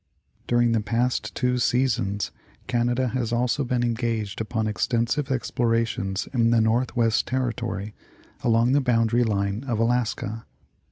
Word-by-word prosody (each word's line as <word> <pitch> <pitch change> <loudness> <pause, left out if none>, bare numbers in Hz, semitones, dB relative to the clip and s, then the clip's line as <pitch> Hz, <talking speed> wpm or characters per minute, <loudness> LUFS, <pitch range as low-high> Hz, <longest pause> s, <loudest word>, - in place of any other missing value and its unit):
During 120 -1 +3
the 115 -1 +2
past 115 +4 -1
two 125 -1 +1
seasons 115 -6 0 0.3
Canada 120 +1 0
has 115 -1 -2
also 125 +4 +1
been 125 -1 0
engaged 115 -3 -2
upon 110 0 -2
extensive 115 +5 0
explorations 115 -6 -1
in 115 -3 +3
the 115 0 +4
Northwest 115 0 +1
territory, 120 -5 -2 0.5
along 115 +1 +3
the 140 +1 +4
boundary 120 -1 +2
line 100 0 -1
of 120 -4 -1
Alaska. 115 -1 -1
115 Hz, 125 wpm, -25 LUFS, 110-125 Hz, 0.5 s, the